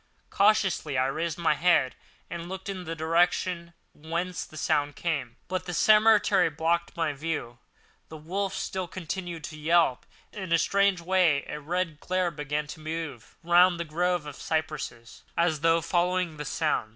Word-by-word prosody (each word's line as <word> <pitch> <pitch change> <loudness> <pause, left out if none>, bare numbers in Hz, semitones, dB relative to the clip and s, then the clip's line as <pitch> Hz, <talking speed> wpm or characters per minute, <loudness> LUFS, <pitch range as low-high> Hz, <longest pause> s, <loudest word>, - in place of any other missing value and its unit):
Cautiously 195 -8 +2
I 130 - +3
raised 160 +4 -2
my 170 -3 +2
head 155 -3 +3 0.3
and 170 0 -6
looked 190 +1 -6
in 185 -2 -5
the 165 +1 -4
direction 170 +1 +1 0.2
whence 170 +4 -3
the 155 - -13
sound 145 -1 0
came; 140 -9 -2
but 185 -1 -3
the 175 - -3
cemetery 210 -4 +5
blocked 165 +3 -1
my 165 -3 0
view. 140 -5 -4 0.5
The 160 - -8
wolf 190 +5 -3
still 185 -1 -3
continued 175 -2 -5
to 155 -3 -7
yelp 160 -4 +2 0.3
in 190 -4 -6
a 165 - +6
strange 200 +1 +2
way, 170 -5 +3
and - - -6
a - - -10
red 165 0 -2
glare 185 0 0
began 150 0 -3
to - - -15
move 155 -6 -6
round 175 +1 +5
the 170 - -2
grove 175 +1 0
of 145 -2 -8
cypresses, 150 -9 -4 0.2
as 170 -3 +2
though 165 +2 +3
following 180 -1 0
the 150 - -5
sound. 110 -4 0
170 Hz, 165 wpm, -27 LUFS, 155-180 Hz, 0.5 s, a